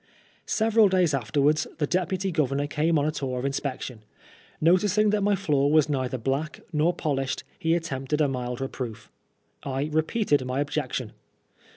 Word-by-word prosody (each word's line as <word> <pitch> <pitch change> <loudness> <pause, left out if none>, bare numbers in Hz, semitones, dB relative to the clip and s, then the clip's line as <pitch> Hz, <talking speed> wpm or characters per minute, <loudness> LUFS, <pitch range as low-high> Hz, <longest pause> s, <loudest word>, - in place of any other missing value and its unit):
Several 220 -1 +4
days 180 -5 +2
afterwards 145 +4 +1
the 150 - +1
Deputy 185 +3 -1
Governor 145 -3 0
came 155 +3 +1
on 145 - +1
a 155 - +1
tour 130 -4 -3
of 125 - -3
inspection. 135 -4 -3 0.6
Noticing 200 +5 +3
that 210 -1 +1
my 205 0 +3
floor 145 -7 +1
was 155 -1 +4
neither 130 -2 -1
black 135 +6 -2
nor 155 +3 +3
polished, 135 -6 -2 0.2
he 165 -2 +2
attempted 150 -3 -2
a 150 - +4
mild 125 -2 -3
reproof. 120 -4 -5 0.5
I 140 +3 -3
repeated 160 - +1
my 130 +1 -2
objection. 140 -5 -2
150 Hz, 155 wpm, -26 LUFS, 135-170 Hz, 0.6 s, Several